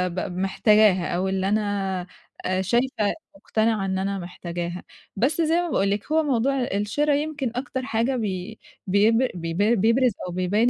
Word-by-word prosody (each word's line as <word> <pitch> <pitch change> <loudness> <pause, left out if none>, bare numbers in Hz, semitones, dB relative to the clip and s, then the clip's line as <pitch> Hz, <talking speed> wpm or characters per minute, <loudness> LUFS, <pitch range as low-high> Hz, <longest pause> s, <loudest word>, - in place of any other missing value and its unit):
ب 180 -1 -3
محتاجاها، 195 -1 +3
أو 185 +2 0
اللي 190 0 0
أنا 200 -3 -1 0.5
شايفة 230 +1 +1 0.2
مقتنعة 220 0 0
إن 190 0 -1
أنا 195 0 -2
محتاجاها. 175 0 -5 0.3
بس 270 - +1
زي 325 +1 +2
ما 350 - -3
باقول 200 -7 +1
لِك 210 +9 -3
هو 320 0 +3
موضوع 270 0 +1
الشرا 245 +7 0
يمكن 290 -4 -1
أكتر 260 0 -3
حاجة 235 +2 0
بي 205 -1 -4 0.3
بيبر 225 +6 +3
بي 165 -1 -4 0.2
بيبرز 230 +4 +3 0.2
أو - - -5
بيبين 195 +7 +2
210 Hz, 150 wpm, -24 LUFS, 190-250 Hz, 0.5 s, محتاجاها